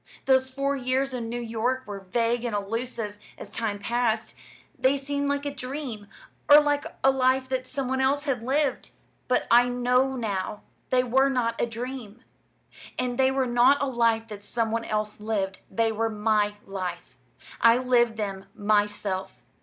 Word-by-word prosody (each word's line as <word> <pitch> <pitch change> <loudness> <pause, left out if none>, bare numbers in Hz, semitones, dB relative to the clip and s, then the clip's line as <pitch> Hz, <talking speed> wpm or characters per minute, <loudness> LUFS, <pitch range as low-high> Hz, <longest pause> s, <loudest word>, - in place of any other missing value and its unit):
Those 260 -1 +3
four 275 +1 -1
years 260 +1 0
in 235 -2 -4
New 240 +1 -3
York 240 +3 -1
were 205 -1 -6
vague 230 +5 0
and 235 -3 -2
elusive, 210 0 -4 0.2
as 200 - -10
time 215 -3 -2
passed. 230 +1 -1 0.4
They 265 +2 +2
seemed 280 +1 -2
like 285 0 -1
a 285 - -2
dream, 255 -5 -6 0.4
or 290 +1 +10
like 290 -1 +1 0.2
a 270 - +6
life 260 0 +2
that 255 -1 -2
some 265 0 -3
one 265 +1 0
else 280 +2 +2
had 270 -5 -1
lived. 270 +2 0 0.4
But 250 - +2
I 245 +1 +6
know 250 +2 +2
now; 210 -4 -3 0.3
they 255 -1 +3
were 265 +3 +3
not 235 -3 0
a - - +1
dream, 235 -1 -7 0.7
and 250 0 -2
they 265 0 +5
were 265 0 +1
not 245 +3 +4
a - - +1
life 230 -3 +1
that 205 -1 -8
some 225 +1 -1
one 230 0 -1
else 215 0 -2
lived. 200 -3 -2
They 225 +3 +1
were 225 +1 0
my 210 -1 +1
life. 190 -2 -5 0.5
I 230 0 +7
lived 240 -3 +2
them 195 -3 -4
myself. 205 -2 0
240 Hz, 170 wpm, -26 LUFS, 215-260 Hz, 0.7 s, or